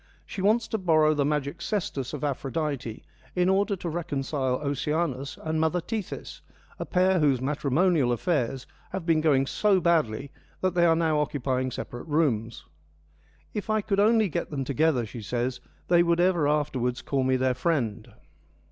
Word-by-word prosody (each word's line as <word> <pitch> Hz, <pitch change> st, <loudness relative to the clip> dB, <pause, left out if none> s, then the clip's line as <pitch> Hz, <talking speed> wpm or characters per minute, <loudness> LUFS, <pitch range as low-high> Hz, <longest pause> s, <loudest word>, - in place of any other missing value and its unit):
She 195 Hz, -, -6 dB
wants 220 Hz, +4 st, +2 dB
to 220 Hz, -, -1 dB
borrow 155 Hz, -4 st, +4 dB
the 145 Hz, -2 st, +1 dB
magic 150 Hz, +2 st, -2 dB
cestus 155 Hz, -, -2 dB
of 150 Hz, -1 st, -6 dB
Aphrodite 135 Hz, -3 st, -3 dB, 0.3 s
in 180 Hz, 0 st, +2 dB
order 200 Hz, +2 st, +2 dB
to 175 Hz, -, -6 dB
reconcile 145 Hz, -5 st, -2 dB
Oceanus 140 Hz, 0 st, -2 dB
and 160 Hz, 0 st, -1 dB
mother 160 Hz, +3 st, +1 dB
Tethys, 215 Hz, +2 st, -6 dB, 0.4 s
a -, -, -4 dB
pair 185 Hz, 0 st, +3 dB
whose 140 Hz, -5 st, +3 dB
matrimonial 145 Hz, +1 st, +1 dB
affairs 135 Hz, -, -1 dB, 0.3 s
have 190 Hz, -3 st, -4 dB
been 165 Hz, -2 st, +3 dB
going 140 Hz, -4 st, +3 dB
so 200 Hz, +6 st, +2 dB
badly 140 Hz, -7 st, +1 dB, 0.3 s
that 185 Hz, -2 st, +1 dB
they 175 Hz, -1 st, +4 dB
are 165 Hz, -, +4 dB
now 160 Hz, -2 st, +1 dB
occupying 130 Hz, -3 st, -1 dB
separate 120 Hz, +2 st, -7 dB
rooms. 125 Hz, -8 st, 0 dB, 0.4 s
' 75 Hz, 0 st, -34 dB
If 210 Hz, 0 st, -4 dB
I 215 Hz, 0 st, +2 dB
could 200 Hz, -1 st, -1 dB
only 220 Hz, +1 st, +4 dB
get 165 Hz, -, -3 dB
them 140 Hz, -3 st, -3 dB
together,' 140 Hz, -1 st, +1 dB
she 115 Hz, +2 st, -8 dB
says, 125 Hz, +4 st, -2 dB
' -, -, -34 dB
they 175 Hz, -1 st, +5 dB
would 170 Hz, 0 st, +2 dB
ever 175 Hz, -4 st, +3 dB
afterwards 135 Hz, -5 st, 0 dB
call 135 Hz, -2 st, 0 dB
me 130 Hz, 0 st, +2 dB
their 130 Hz, 0 st, +1 dB
friend.' 125 Hz, -6 st, -1 dB
150 Hz, 170 wpm, -27 LUFS, 130-175 Hz, 0.4 s, they